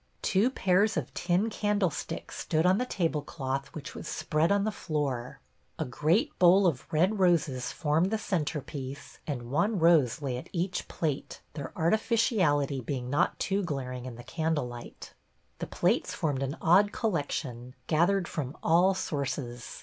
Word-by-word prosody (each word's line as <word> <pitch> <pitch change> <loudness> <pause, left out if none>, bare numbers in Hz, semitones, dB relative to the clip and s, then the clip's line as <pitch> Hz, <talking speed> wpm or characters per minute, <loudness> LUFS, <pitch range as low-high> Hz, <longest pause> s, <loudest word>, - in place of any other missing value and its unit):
Two 200 +6 +3
pairs 205 -2 +2
of - - -3
tin 180 +5 +1
candlesticks 205 -6 -1
stood 160 +1 0
on 185 +2 +4
the 250 - -1
tablecloth 145 - -2
which 155 - -7
was - - -7
spread 155 +4 0
on 200 0 +3
the 215 - 0
floor. 140 - -3 0.4
A - - -2
great 165 - +1
bowl 185 +2 +6
of 155 -8 0
red 185 +7 +2
roses 155 -9 +2
formed 160 +4 +1
the 220 - 0
centrepiece, 145 -7 -4
and 120 -5 -4
one 205 +9 +1
rose 160 -8 +4
lay 135 -4 -2
at 125 - -9
each 180 +1 -2
plate, 150 -4 -3
their 145 -4 -6
artificiality 170 - +2
being 125 0 -4
not 145 - +2
too 195 +2 0
glaring 130 -7 -4
in 125 - -7
the 120 - -10
candle 160 -4 -1
light. 120 -1 -10 0.5
The - - -4
plates - - 0
formed 145 -4 -1
an 135 +3 -2
odd 195 +5 +5
collection, 140 - -3
gathered 175 +3 +2
from 140 -3 -4
all 180 +4 +4
sources. 135 -7 -4
155 Hz, 155 wpm, -29 LUFS, 135-185 Hz, 0.5 s, bowl